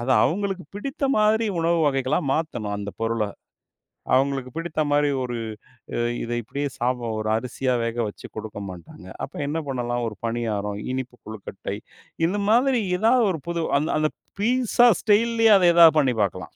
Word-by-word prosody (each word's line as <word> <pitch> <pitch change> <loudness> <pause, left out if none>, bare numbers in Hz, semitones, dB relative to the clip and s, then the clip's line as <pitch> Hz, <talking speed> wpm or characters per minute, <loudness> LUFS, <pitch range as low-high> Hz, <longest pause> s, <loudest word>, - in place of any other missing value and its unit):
அத 120 - -5 0.2
அவங்களுக்கு 195 +1 -1
பிடித்த 275 +7 -4
மாதிரி 215 +1 +3 0.2
உணவு 170 +1 +2
வகைகளா 135 +1 +1
மாத்தணும், 120 -10 -2
அந்த 100 0 -5
பொருள. 115 -1 0 0.9
அவங்களுக்கு 135 -1 +1
பிடித்த 165 -1 -3
மாதிரி, 145 0 +3
ஒரு 120 -1 -3 0.9
இத 120 - -5
இப்படியே 140 +6 -3
சாப்பிடு, 125 -1 -1
ஒரு 110 0 -2
அரிசியா 125 +2 -1
வேகவச்சு 115 -2 -3
கொடுக்க 105 -1 -6
மாட்டாங்க. 90 0 -11 0.2
அப்ப - - -18
என்ன 160 +3 -1
பண்ணலாம்? 120 -2 -2
ஒரு 105 - -6
பணியாரம், 105 -3 -2
இனிப்பு 130 -1 -5
கொழுக்கட்டை, 100 -2 -6 0.5
இந்த 200 +4 -1
மாதிரி 250 +2 +4 0.2
ஏதாவது 235 +2 +4
ஒரு 160 -5 -4
புது, 170 -1 -1 0.2
அந்த 155 - -1
அந்த 155 0 +2 0.3
பீட்சா 245 +2 +3
ஸ்டைல்லயே 225 +1 +4
அத 180 - +4
எதாவது 165 -2 +8
பண்ணி 130 -4 +2
பாக்கலாம். 95 - -4
140 Hz, 150 wpm, -24 LUFS, 115-190 Hz, 0.9 s, எதாவது